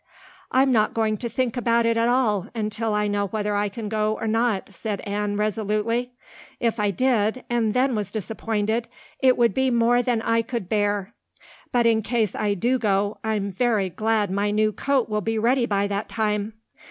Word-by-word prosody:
"I'm 265 +1 +4
not 215 -3 +2
going 220 -1 +1
to 235 - -4
think 250 +1 -1
about 235 -1 +2
it 230 0 +2
at 230 +1 +2
all 235 -6 +1
until 220 0 -2
I 210 0 +1
know 205 0 0
whether 210 0 -2
I 205 0 0
can 215 +2 -6
go 215 0 0
or - - -3
not," 220 -3 0
said 210 0 -4
Anne 205 0 -2
resolutely. 215 +3 -1 0.5
"If 230 -2 0
I 205 -1 +2
did 230 +2 +1
and 230 -2 +1
then 260 +1 +2
was 210 -3 -2
disappointed, 220 +2 -2 0.3
it 260 -1 +4
would 235 -1 +3
be 265 0 +2
more 240 0 +3
than 240 -2 0
I 230 0 +2
could 230 -4 -4
bear. 205 0 0 0.6
But 240 -1 +2
in 225 -1 +4
case 220 -2 0
I 205 -1 0
do 245 +7 +1
go 205 -1 0
I'm 210 -2 -1
very 210 -2 +1
glad 215 -1 0
my 200 +2 0
new 215 +1 +2
coat 270 +3 0
will 210 -1 -1
be 225 +2 -1
ready 240 +2 +2
by 200 -1 +1
that 200 +1 -3
time. 210 -1 -1
220 Hz, 190 wpm, -24 LUFS, 205-235 Hz, 0.6 s, I'm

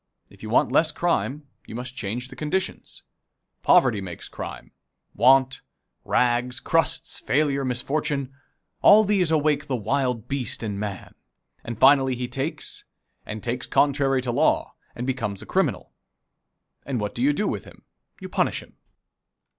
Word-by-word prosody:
If - - -18
you 110 - -7
want 115 - +3
less 160 0 +3
crime, 150 -3 -1 0.2
you - - -8
must 125 +1 -6
change 125 +1 -4
the - - -11
conditions. 185 +5 -3 0.6
Poverty 120 -6 +4
makes 90 -3 -7
crime. - - -8 0.4
Want, 130 0 +4 0.4
rags, 125 0 +1
crusts, - - 0
failure, 140 -1 +1
misfortune 135 +2 -1 0.5
all 215 +1 +8
these 195 -5 +2
awake 155 -2 +1
the 130 - -1
wild 125 0 -1
beast 135 -3 -2
in 105 -3 -3
man, 100 -3 -5 0.5
and 115 -1 -6
finally 135 -1 +5
he 125 0 -3
takes, 135 +5 -3 0.4
and 110 -1 -6
takes 120 +1 -3
contrary 135 -2 +2
to 125 - -1
law, 145 +6 +1 0.2
and 120 - -4
becomes 115 -7 -3
a - - -11
criminal. - - -1 0.9
And 130 -3 -3
what 105 -1 -3
do 120 - -4
you 140 +3 +4
do 205 +8 -1
with - - -3
him? - - -16 0.4
You - - -7
punish - - -1
him. - - -22
130 Hz, 150 wpm, -24 LUFS, 120-145 Hz, 0.9 s, all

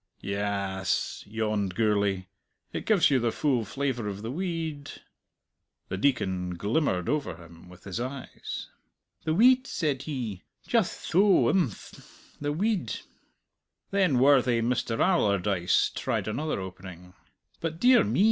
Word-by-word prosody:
"Ya 100 -1 -2
as," 95 - -1
yawned 105 -3 -1
Gourlay; 100 -3 +1 0.5
"it - - -5
gives 200 -9 +4
you 135 - +4
the 115 -1 +1
full 130 -4 +1
flavour 125 -1 -2
of 100 0 -5
the 115 - -3
we 185 +7 -2
eed." 160 -4 -4 1.0
The 95 - -3
Deacon 95 -7 0
glimmered 100 - 0
over 145 - -1
him 85 +1 -15
with 90 0 -15
his 95 +1 -5
eyes. 130 +2 -6 0.5
"The 155 - +1
weed," 255 +5 +5
said 150 -6 -1
he. 120 - -4 0.3
"Jutht 225 -6 0
tho! 195 +3 +5
Imphm. 170 - -2 0.4
The 145 0 -1
weed." 185 - -1 0.9
Then 190 -9 +3
worthy 130 -2 +4
Mister 115 -1 -1
Allardyce 100 - +2
tried - - -2
another 145 +4 -2
opening. 90 -1 -9 0.5
"But, 165 0 -4
dear 245 -2 +6
me!" - - -1
120 Hz, 135 wpm, -27 LUFS, 100-155 Hz, 1.0 s, dear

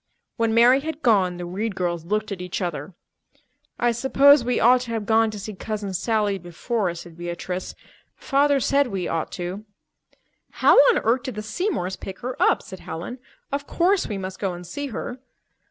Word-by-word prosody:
When 230 -1 +1
Mary 245 +3 +6
had 315 +1 -6
gone, 190 -7 +3
the 175 - -5
Reed 200 +4 -3
girls 170 -3 -2
looked 215 +3 -1
at 190 -2 -4
each 180 0 -4
other. 170 -1 -4 0.8
"I 240 0 +3
suppose 270 +3 +5
we 245 +1 0
ought 250 +2 +5
to 240 -2 -6
have 220 -2 -2
gone 225 +1 +3
to 215 - -7
see 210 +2 -6
Cousin 205 0 -4
Sally 205 0 0
before," 180 +4 -2
said 170 -1 -10
Beatrice. 175 +2 -5 0.4
"Father 280 0 +2
said 280 +2 +2
we 195 -6 -3
ought 165 -1 -2
to." 180 +3 -5 0.9
"How - - +5
on 475 - +4
earth 240 +3 +2
did 260 -4 -6
the 215 - -5
Seymours 210 - -2
pick 190 -1 -8
her 250 +1 -4
up?" - - +3
said 190 - -10
Helen. 175 +10 -7 0.3
"Of 280 +1 -3
course 370 +3 +2
we 205 - -3
must 190 0 -6
go 195 -3 -1
and 175 0 -9
see 285 +12 -5
her." 245 0 -6
215 Hz, 185 wpm, -23 LUFS, 180-250 Hz, 0.9 s, Mary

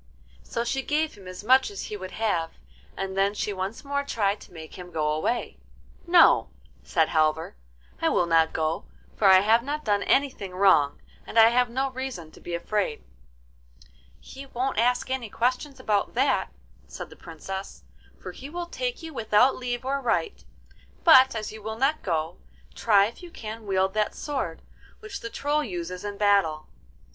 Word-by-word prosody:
So 235 - -3
she 270 +3 -1
gave 305 +3 0
him 195 -3 -14
as 185 +2 -8
much 260 +4 +5
as 200 -2 -6
he 210 - -5
would 185 -2 -7
have, 175 -7 -1 0.4
and 190 0 -4
then 195 +1 +1
she 210 - -2
once 195 +8 -5
more 280 0 -1
tried 210 -7 -1
to - - -14
make 160 -2 -10
him 180 -1 -9
go 155 -3 -1
away. 155 +11 -2 0.5
'No,' 345 -1 +6 0.3
said 160 -2 +1
Halvor, 155 - +1 0.5
'I - - +3
will 175 - +2
not 165 -1 +3
go, 160 +1 -2 0.3
for 205 - +3
I 190 -1 +8
have 220 +3 +4
not 295 +4 -4
done 205 -1 +2
anything 260 -10 0
wrong, 180 -7 +4 0.3
and - - -5
I 225 0 +9
have 245 +1 +2
no 265 +3 -1
reason 255 -11 -6
to - - -16
be 175 - -4
afraid.' 185 -2 -2 1.2
'He 275 +1 -11
won't 260 -2 -2
ask 245 +2 +1
any 255 -4 -2
questions 255 +5 -1
about 210 -5 0
that,' - - +1 0.4
said - - -8
the - - -12
Princess, 180 - -8 0.4
'for - - -7
he 265 +9 -10
will 345 +2 -4
take - - -4
you 320 -1 -7
without 225 +2 +3
leave 245 0 -4
or 275 +1 -1
right; 405 - -1 0.6
but 265 -7 +7
as 215 -1 -4
you 220 0 -10
will 220 +1 -5
not 275 +5 +1
go, 160 - -2 0.3
try 200 - +4
if 230 - -7
you 355 - -10
can 220 -7 -8
wield 190 0 +1
that 215 0 0
sword 265 - -4 0.4
which 420 -2 -7
the 230 - -6
Troll 295 +5 0
uses 180 -4 -5
in 205 -1 -5
battle. 195 -7 +2
215 Hz, 180 wpm, -26 LUFS, 185-265 Hz, 1.2 s, I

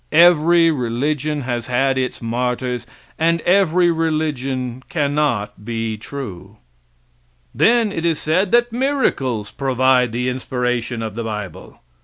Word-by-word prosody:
Every 170 0 +6
religion 145 +3 -1
has 120 -2 -3
had 135 +2 +1
its 130 -2 -3
martyrs, 125 0 -2 0.3
and 165 +1 +2
every 180 -2 +3
religion 135 -6 -2
cannot 140 -10 -1
be 115 0 -3
true. 105 -4 -8 1.0
Then 230 -2 +3
it 165 - -4
is 165 -2 +1
said 180 +6 0
that 240 0 +3
miracles 230 - 0
prove 135 -3 -3
the 125 -2 +2
inspiration 125 -2 -2
of 110 -2 -4
the 115 +2 -4
bible. 105 -4 -7
130 Hz, 120 wpm, -19 LUFS, 120-165 Hz, 1.0 s, Every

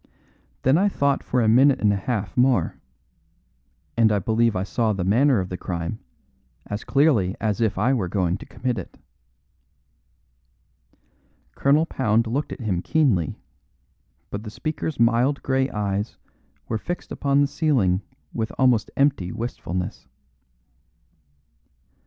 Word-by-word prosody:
Then 135 +6 +4
I 205 +2 +3
thought 140 -6 0
for 125 -1 0
a - - +2
minute 130 +5 +5
and 105 -1 +3
a - - +1
half 100 0 -3
more. 125 -9 +2 1.2
And 115 -2 +4
I 105 - +2
believe 110 +3 +1
I 90 - 0
saw 110 +2 0
the 95 -2 -2
manner 120 +6 +3
of 90 -1 -3
the 90 - -4
crime, 85 +4 -4 0.7
as 105 +1 -5
clearly 125 - +2
as 110 0 -1
if 110 -3 +1
I 130 - +2
were 105 -9 0
going 90 0 0
to - - -11
commit 125 -2 -3
it." - - -10 2.6
Colonel 145 +4 +3
Pound 115 -7 +1
looked 130 +7 -2
at - - -7
him 95 -6 -1
keenly, 115 - +1 0.9
but 100 - -4
the 110 - -7
speaker's 155 +4 -4
mild 120 +4 +2
grey 130 0 +1
eyes 100 0 -3 0.5
were 110 - -2
fixed 175 +8 -5
upon 140 0 +1
the 145 - +3
ceiling 125 - +1 0.3
with 110 0 -2
almost 125 -4 +3
empty 135 -11 +2
wistfulness. 90 -6 -5
115 Hz, 140 wpm, -23 LUFS, 100-135 Hz, 2.6 s, minute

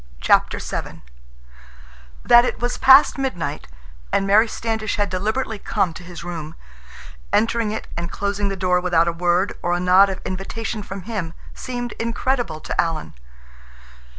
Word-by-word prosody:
CHAPTER - - +3
VII - - -6 1.2
That 240 0 +7
it 250 - -2
was 245 0 -2
past 270 +1 +7
midnight, 170 - -3 0.4
and 195 - +1
Mary 210 +4 +5
Standish 220 -1 -3
had 205 -2 -1
deliberately 215 +4 -2
come 180 -3 -1
to 170 - -10
his 175 -1 -9
room, 165 -3 -6 0.8
entering 230 0 +1
it 215 - -5
and 170 0 -3
closing 200 0 -2
the 195 - -3
door 180 -1 +1
without 170 -2 +2
a - - +2
word 175 +2 +1
or 175 - 0
a 175 - 0
nod 185 +2 +5
of 190 - -4
invitation 210 +4 -4
from 195 -1 -7
him, 190 -7 -5 0.2
seemed 245 -2 -5
incredible 230 -6 -1
to - - 0
Alan. 160 - -4
195 Hz, 150 wpm, -21 LUFS, 175-225 Hz, 1.2 s, That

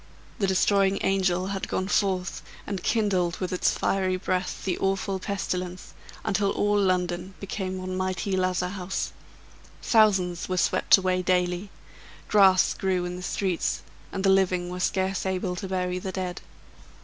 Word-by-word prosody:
The 195 - +2
destroying 195 +1 +3
angel 185 -2 +1
had 195 -1 -3
gone 185 - -2
forth, 190 -3 0 0.2
and 195 -3 -4
kindled 190 -6 +1
with 185 -1 -3
its 180 - +2
fiery 190 -1 +1
breath 185 0 -2
the 185 -2 0
awful 195 0 0
pestilence, 185 -2 -4 0.3
until 200 -2 +1
all 205 +1 +2
London 180 0 0
became 190 -1 -4
one 185 0 -4
mighty 185 +1 -1
lazar 185 -1 0
house. 190 0 -3 0.7
Thousands 190 -7 +3
were 185 - -1
swept - - +4
away 185 -1 0
daily; 180 +1 0 0.6
grass 190 -3 +5
grew 185 -2 -1
in 180 0 -4
the 180 - -7
streets, 180 -1 -1 0.3
and 190 - -3
the 195 - +5
living 185 -2 +2
were 180 - -5
scarce 190 +1 0
able 185 -1 -1
to 195 - -4
bury 180 -1 -1
the 190 +1 -4
dead. 185 -1 -4
185 Hz, 150 wpm, -26 LUFS, 180-195 Hz, 0.7 s, grass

